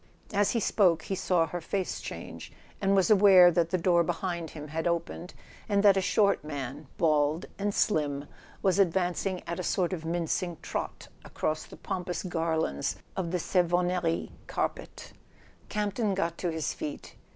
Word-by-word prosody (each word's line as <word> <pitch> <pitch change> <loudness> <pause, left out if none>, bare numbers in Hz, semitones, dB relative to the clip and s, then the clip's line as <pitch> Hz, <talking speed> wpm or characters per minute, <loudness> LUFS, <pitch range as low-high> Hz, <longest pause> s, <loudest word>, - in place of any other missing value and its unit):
As 205 0 +3
he 235 - +1
spoke 180 -6 +3
he 195 - -3
saw 180 -3 +2
her 175 +2 -5
face 190 +2 -2
change, - - -8 0.3
and 195 0 +3
was 195 +2 +3
aware 190 -3 +8
that 170 -1 +1
the 185 - +1
door 170 0 +3
behind 170 0 -3
him 150 -1 -9
had 160 +2 -2
opened 170 +1 -3 0.3
and 200 -1 +2
that 200 -2 +7
a 195 - +2
short 200 -1 +2
man, 145 -1 -6
bald 155 0 +2
and 205 +1 0
slim, 145 -8 0 0.4
was 190 0 +3
advancing 185 0 +1
at 170 - -4
a - - -2
sort 180 +1 0
of 175 - -3
minc¬ 165 0 -1
ing 175 -3 -5
trot - - -4 0.2
across 155 0 -2
the - - -12
pompous 180 +1 -4
garlands 160 - -1 0.2
of 180 -3 -2
the 180 - 0
Savon 175 0 +1
nerie 175 -2 -1 0.2
carpet. - - -4 0.6
Campton 210 0 -1
got 170 -3 -1
to 180 - -1
his 160 -1 -2
feet. 150 - -6
175 Hz, 170 wpm, -29 LUFS, 160-190 Hz, 0.6 s, aware